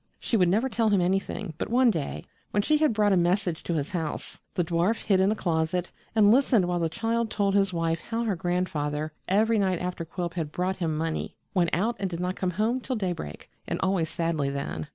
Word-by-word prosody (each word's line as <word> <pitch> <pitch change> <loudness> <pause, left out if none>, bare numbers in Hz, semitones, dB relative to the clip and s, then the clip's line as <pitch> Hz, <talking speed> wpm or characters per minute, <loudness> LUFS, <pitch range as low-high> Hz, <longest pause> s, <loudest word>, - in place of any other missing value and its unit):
She - - -1
would 180 -5 +4
never 220 +8 +2
tell 230 -3 +1
him 200 -2 +3
anything, 190 0 -1
but - - -2
one 245 +1 +5
day, 160 -8 -4 0.2
when 205 - +1
she 305 +6 +3
had 305 -2 +3
brought 210 -2 +3
a - - +5
message 175 -1 +1
to 170 - -1
his 145 -2 -2
house, 165 -4 -4 0.2
the 175 - +2
dwarf 175 +6 +1
hid 195 -3 +3
in 190 +2 +4
a - - +1
closet 170 -1 -1 0.2
and 210 -2 +6
listened 240 -5 +4
while 175 0 0
the 165 -1 0
child 230 +6 -1
told 200 -2 +1
his 195 -1 +3
wife 165 -1 0
how 230 0 -1
her 215 -4 0
grandfather, 155 -4 -1
every 220 +3 +3
night 190 -2 +2
after 180 0 -3
Quilp 170 +1 -4
had 160 -4 -3
brought 185 +3 -1
him 160 -4 -1
money, 160 0 -2 0.2
went 175 -4 +2
out 220 +7 0
and 195 - -1
did 170 -1 -5
not 180 +1 -1
come 185 - -1
home 230 +4 +1
till 255 +1 -3
daybreak, 180 - -4 0.2
and - - -2
always 185 -4 +1
sadly 160 -3 -1
then. 140 - -4
180 Hz, 225 wpm, -27 LUFS, 165-210 Hz, 0.2 s, and